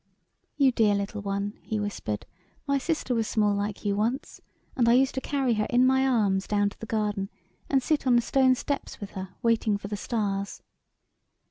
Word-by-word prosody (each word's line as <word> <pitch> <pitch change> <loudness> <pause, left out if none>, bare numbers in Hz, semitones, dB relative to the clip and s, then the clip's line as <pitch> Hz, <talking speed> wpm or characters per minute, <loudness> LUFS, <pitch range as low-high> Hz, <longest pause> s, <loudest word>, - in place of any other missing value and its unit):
" - - -51
You 275 -3 +5
dear 215 -4 +3
little 200 +1 -3
one," 200 +1 -3
he 220 - -3
whispered; 200 - -3 0.2
" - - -37
my 280 0 +2
sister 305 -3 -1
was 225 -2 0
small 210 -2 +2
like 205 +1 -3
you 200 -1 +1
once, 230 +6 -2 0.3
and 235 -3 +3
I - - +6
used 265 +2 +4
to 265 - -3
carry 270 -4 0
her 215 -1 0
in 250 +1 +4
my 265 +1 +3
arms 200 -6 +2
down 205 -1 +2
to - - -17
the 225 - -7
garden, 210 -3 -1 0.4
and 270 -2 +2
sit 300 -2 0
on 245 - +5
the 240 - +5
stone 260 +1 +4
steps 280 +2 -4
with 205 - -7
her, 190 -1 -6
waiting 225 -3 +2
for 200 0 -8
the 210 - -2
stars." 200 -3 -2
220 Hz, 210 wpm, -27 LUFS, 205-260 Hz, 0.4 s, I